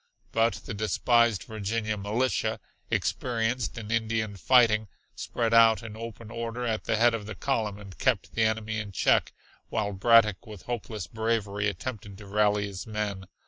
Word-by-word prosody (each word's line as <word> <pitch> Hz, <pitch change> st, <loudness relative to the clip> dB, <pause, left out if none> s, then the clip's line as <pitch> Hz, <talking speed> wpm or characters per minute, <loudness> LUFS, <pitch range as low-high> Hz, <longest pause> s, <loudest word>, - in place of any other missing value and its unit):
But 115 Hz, 0 st, +2 dB
the 115 Hz, -, -5 dB
despised 110 Hz, +1 st, +2 dB
Virginia 110 Hz, 0 st, -2 dB
militia, 110 Hz, +5 st, -1 dB, 0.3 s
experienced 120 Hz, 0 st, -1 dB
in 110 Hz, -1 st, -6 dB
Indian 110 Hz, -2 st, 0 dB
fighting, 110 Hz, 0 st, +4 dB, 0.3 s
spread 115 Hz, -1 st, -2 dB
out 115 Hz, 0 st, +6 dB
in 110 Hz, -2 st, -8 dB
open 115 Hz, 0 st, -8 dB
order 115 Hz, +1 st, -4 dB
at 110 Hz, -2 st, -2 dB
the -, -, +1 dB
head 120 Hz, +1 st, +5 dB
of 105 Hz, -2 st, -4 dB
the 110 Hz, -, -6 dB
column 110 Hz, -7 st, -1 dB
and 100 Hz, -3 st, -11 dB
kept 125 Hz, -6 st, 0 dB
the 115 Hz, -, 0 dB
enemy 110 Hz, 0 st, 0 dB
in 105 Hz, -2 st, -6 dB
check, -, -, +3 dB, 0.4 s
while 105 Hz, -2 st, -1 dB
Braddock 110 Hz, 0 st, +4 dB
with 105 Hz, -4 st, -10 dB
hopeless 110 Hz, -5 st, -4 dB
bravery 110 Hz, -2 st, -1 dB
attempted 105 Hz, -2 st, -6 dB
to 105 Hz, -, -11 dB
rally 105 Hz, 0 st, +2 dB
his 100 Hz, 0 st, -7 dB
men. 105 Hz, -3 st, -3 dB
110 Hz, 160 wpm, -28 LUFS, 105-115 Hz, 0.4 s, out